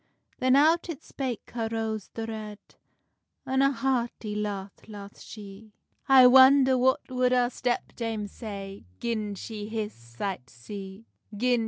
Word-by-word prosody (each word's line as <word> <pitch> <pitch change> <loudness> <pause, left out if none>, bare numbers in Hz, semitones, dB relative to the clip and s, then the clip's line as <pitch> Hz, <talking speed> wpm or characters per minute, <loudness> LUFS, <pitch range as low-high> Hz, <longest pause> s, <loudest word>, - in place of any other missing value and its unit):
Then 255 0 +4
out 325 +5 +4
it 310 -5 -6
spake 260 -4 -5
her 225 -2 -3
Rose 220 -2 -3
the 225 - -3
Red, 215 -2 -6 0.9
An 265 0 +1
a 275 0 +4
hearty 240 -4 -2
laugh 205 -2 -4
laugh 205 -2 -10
she: 210 0 -11 0.4
"I 265 -1 +9
wonder 260 +1 +7
what 260 +3 +3
would 250 0 +2
our 245 -1 +2
step 245 -1 -2
dame 225 -3 -3
say, 200 - -8
Gin 215 -3 -2
she 210 +1 -7
his 220 -1 -3
sight 120 +6 -6
did - - -22
see!" 195 - -9
225 Hz, 145 wpm, -27 LUFS, 205-255 Hz, 0.9 s, I